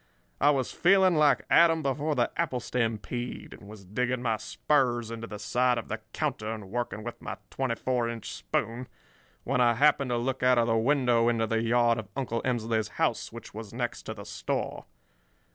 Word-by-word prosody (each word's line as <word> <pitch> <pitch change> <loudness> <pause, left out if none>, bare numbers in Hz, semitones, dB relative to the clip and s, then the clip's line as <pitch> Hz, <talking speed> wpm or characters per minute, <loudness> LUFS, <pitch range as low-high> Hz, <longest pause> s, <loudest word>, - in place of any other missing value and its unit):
I 145 - +5
was 135 -4 +1
feeling 190 0 +4
like 150 -2 +3
Adam 165 -1 +5
before 145 +3 0
the 120 -2 +1
apple 155 -6 -1
stampede, 120 0 -3
and 100 - -13
was 105 -2 -12
digging 125 +5 -1
my 115 -3 +1
spurs 120 -4 0
into 115 0 -6
the 105 - -7
side 125 +4 +1
of 115 - -5
the 110 - -3
counter 130 -8 -2
and 105 -4 -7
working 120 -3 -3
with 120 +1 -7
my - - -5
twenty 130 -3 -1
four 125 -1 -1
inch 115 -2 -6
spoon 115 - -3 0.6
when 130 0 +1
I 120 -1 +4
happened 140 0 +3
to 120 - +1
look 130 +2 -2
out 125 0 +4
of 120 - +4
the 115 -1 +1
window 120 -1 +3
into 115 -1 +1
the 115 +1 0
yard 115 0 +3
of 110 - -7
Uncle 115 -4 -2
Emsley's 115 -4 0
house, - - 0
which - - -10
was 110 0 -8
next 120 -1 -3
to 110 - -4
the 100 -1 -9
store. - - -3
120 Hz, 195 wpm, -28 LUFS, 115-130 Hz, 0.6 s, I